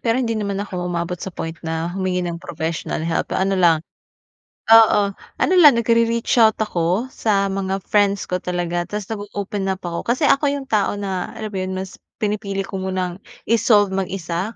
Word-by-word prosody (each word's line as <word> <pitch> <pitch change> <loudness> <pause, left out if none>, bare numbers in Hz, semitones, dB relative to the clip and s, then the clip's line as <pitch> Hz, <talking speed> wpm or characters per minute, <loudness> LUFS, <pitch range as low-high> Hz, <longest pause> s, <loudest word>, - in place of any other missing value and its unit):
Pero 230 0 +1
hindi 240 -3 0
naman 200 -1 -2
ako 185 -3 -4
umabot 175 0 -3
sa - - -4
point 165 -3 -5
na 165 +1 -3
humingi 185 -1 -1
ng 170 -1 -4
professional 160 -2 -4
help. 165 0 -1
Ano 195 +1 +1
lang. 165 -2 +4 0.9
Oo. 210 -3 +6 0.2
Ano - - +2
lang 300 -9 +7
nagre-reach 230 +1 +2
out 220 -1 +5
ako 185 +1 0
sa 200 -3 +1
mga 195 0 -2
friends 200 -2 +2
ko 180 0 -3
talaga. 175 -1 -2
Tas 210 0 -4
nag-oopen 205 -2 -4
up 190 -1 -4
ako, 170 -1 -3
kasi 255 +5 +2
ako 285 0 +3
'yung 280 -1 -3
tao 210 -4 0
na, 190 -3 -3
ano 220 -1 -6
ba 190 - -3
'yun, 185 0 -3
mas 190 0 -6 0.3
pinipili 205 -2 -1
ko 195 0 -6
munang 185 -1 -3 0.3
i-solve 210 -3 +4
mag-isa 190 +1 -3
195 Hz, 175 wpm, -21 LUFS, 180-215 Hz, 0.9 s, lang